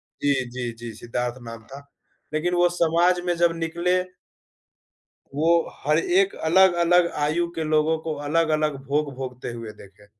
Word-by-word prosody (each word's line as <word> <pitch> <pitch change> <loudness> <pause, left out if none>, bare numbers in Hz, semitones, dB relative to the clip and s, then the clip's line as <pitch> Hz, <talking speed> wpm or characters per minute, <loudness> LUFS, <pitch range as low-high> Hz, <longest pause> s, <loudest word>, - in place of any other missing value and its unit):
जी, 135 -4 -2
जी, 120 -1 -4
जी, 120 0 -8
सिद्धार्थ 120 +1 -4
नाम 115 0 -9
था। 140 +1 -11 0.5
लेकिन 175 +4 0
वो 175 0 +4
समाज 175 +2 +3
में 175 - +1
जब 170 -1 +2
निकले 170 +2 0 1.4
वो 160 +2 +2 0.3
हर 150 +3 +2 0.2
एक 195 - -3
अलग-अलग 175 -1 +5 0.2
आयु 170 +3 0
के 160 - -2
लोगों 155 +1 +2
को 155 - -1 0.2
अलग-अलग 155 -4 +1
भोग 145 -1 -1
भोगते 125 -2 -6
हुए 115 -2 -7
देखे। 100 +1 -18
155 Hz, 145 wpm, -24 LUFS, 125-170 Hz, 1.4 s, अलग-अलग